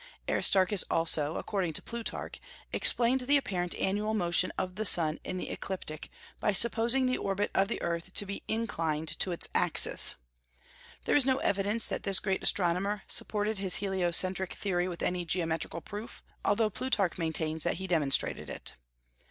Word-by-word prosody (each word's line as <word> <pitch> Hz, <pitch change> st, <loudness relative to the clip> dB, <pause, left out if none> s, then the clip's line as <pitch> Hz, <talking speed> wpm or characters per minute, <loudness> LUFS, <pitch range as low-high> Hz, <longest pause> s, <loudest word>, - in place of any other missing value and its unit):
Aristarchus 190 Hz, 0 st, +3 dB
also, 160 Hz, -2 st, +2 dB
according 185 Hz, -6 st, -2 dB
to -, -, -1 dB
Plutarch, 235 Hz, -1 st, -5 dB, 0.3 s
explained 245 Hz, +2 st, +3 dB
the 280 Hz, +3 st, +4 dB
apparent 180 Hz, -9 st, -2 dB
annual 210 Hz, +3 st, 0 dB
motion 175 Hz, -2 st, +2 dB
of 185 Hz, -1 st, -2 dB
the 215 Hz, +3 st, -3 dB
sun 165 Hz, -6 st, +3 dB
in 185 Hz, -, -4 dB
the -, -, -4 dB
ecliptic 160 Hz, -5 st, -5 dB, 0.3 s
by 210 Hz, -, +1 dB
supposing 235 Hz, +5 st, +3 dB
the 255 Hz, 0 st, 0 dB
orbit 200 Hz, +1 st, -1 dB
of 195 Hz, -, +3 dB
the 235 Hz, -, -3 dB
earth 170 Hz, +2 st, -3 dB
to 205 Hz, -, +4 dB
be 200 Hz, 0 st, -5 dB
inclined 160 Hz, -9 st, -2 dB
to -, -, 0 dB
its 170 Hz, -, -1 dB
axis. -, -, +4 dB, 0.9 s
There -, -, +2 dB
is 290 Hz, -, +5 dB
no 260 Hz, -1 st, +3 dB
evidence 205 Hz, -1 st, +1 dB
that -, -, -2 dB
this 195 Hz, -1 st, +2 dB
great 190 Hz, -2 st, -1 dB
astronomer 190 Hz, +3 st, +1 dB
supported 210 Hz, 0 st, -1 dB
his 190 Hz, -2 st, -1 dB
heliocentric 190 Hz, -1 st, 0 dB
theory 180 Hz, -3 st, -1 dB
with 175 Hz, -2 st, -5 dB
any 180 Hz, -1 st, 0 dB
geometrical 165 Hz, -1 st, -2 dB
proof, 210 Hz, +6 st, -7 dB, 0.2 s
although 215 Hz, +1 st, +2 dB
Plutarch 200 Hz, -6 st, 0 dB
maintains 160 Hz, -1 st, -1 dB
that 175 Hz, -, 0 dB
he 190 Hz, -, -5 dB
demonstrated 155 Hz, -7 st, 0 dB
it. -, -, -7 dB
190 Hz, 160 wpm, -30 LUFS, 170-210 Hz, 0.9 s, is